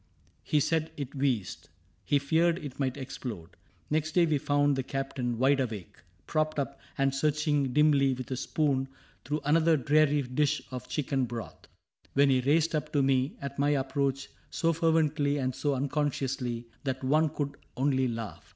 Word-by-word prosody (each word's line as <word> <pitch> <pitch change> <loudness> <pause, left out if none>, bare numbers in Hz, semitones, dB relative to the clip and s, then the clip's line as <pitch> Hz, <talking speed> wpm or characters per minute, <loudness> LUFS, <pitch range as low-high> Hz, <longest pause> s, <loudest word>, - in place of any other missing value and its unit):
He 150 - +1
said 160 +2 0
it 140 -3 -5
wheezed. 130 - -2 0.4
He 145 - +3
feared 160 +4 +2
it 145 -6 -8
might 130 -1 -1
explode. 120 -10 -6 0.4
Next 155 0 0
day 175 0 +5
we 155 -3 +1
found 145 0 +2
the 135 - 0
Captain 130 -2 -3
wide 135 +3 +3
awake. 110 -8 -4 0.3
Propped 155 -1 0
up, 140 -1 -3 0.2
and 135 0 +2
searching 145 -1 +1
dimly 140 -2 +4
with 130 +1 -7
a - - 0
spoon 135 0 0 0.4
Through 150 +3 -2
another 160 +2 +4
dreary 150 +1 +3
dish 145 +4 +1
of 125 -1 -6
chicken 135 -3 -1
broth. 115 -2 -6
CAPTAIN - - -28
CRAIG - - -29
71 135 -2 +4
Which 125 - -1
he 135 - 0
raised 160 +1 +3
up 150 - -2
to 145 -2 +3
me, 135 0 +1
at 140 0 -5
my 145 +1 +3
approach. 135 0 -1 0.2
So 165 0 +1
fervently 155 -3 +2
and 130 -2 -1
so 145 +2 -1
unconsciously, 135 -3 -2 0.2
That 130 -1 -3
one 155 +4 +3
could 140 -1 -4 0.2
only 130 -1 +2
laugh. 115 -3 -6
140 Hz, 175 wpm, -29 LUFS, 130-150 Hz, 0.4 s, day